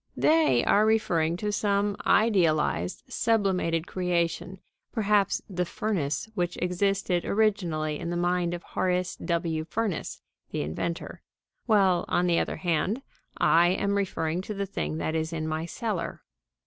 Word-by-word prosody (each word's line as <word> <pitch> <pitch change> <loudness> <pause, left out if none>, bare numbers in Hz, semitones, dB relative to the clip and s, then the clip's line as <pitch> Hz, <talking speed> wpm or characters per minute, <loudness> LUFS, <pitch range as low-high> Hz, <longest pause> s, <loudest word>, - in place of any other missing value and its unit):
They 315 0 +4
are 210 - +4
referring 175 -7 +2
to 210 +2 -2
some 205 0 +1
idealized, 160 - +2
sublimated 190 -7 +1
creation; 180 0 -1 0.3
perhaps 205 -3 +1
the 180 -3 -1
"furnace" 170 -4 -2
which 175 -4 -2
existed 180 0 0
originally 175 -8 0
in 170 - -4
the 175 - -2
mind 175 0 +1
of 175 - -9
Horace 180 -1 -1
W. 165 -2 -1
Furnace, 200 +3 -3 0.3
the - - -2
inventor; 80 - -4 0.5
while, 195 -5 +3
on 175 - +1
the 170 -1 +3
other - - -2
hand, 185 - 0 0.3
I 170 +1 +5
am 200 +3 +1
referring 175 -4 -1
to 210 +2 -6
the 200 0 -2
thing 190 -5 -3
that 160 - -2
is 160 0 -1
in 160 -1 -3
my 160 +1 -2
cellar. 210 -1 -4
180 Hz, 140 wpm, -27 LUFS, 165-200 Hz, 0.5 s, I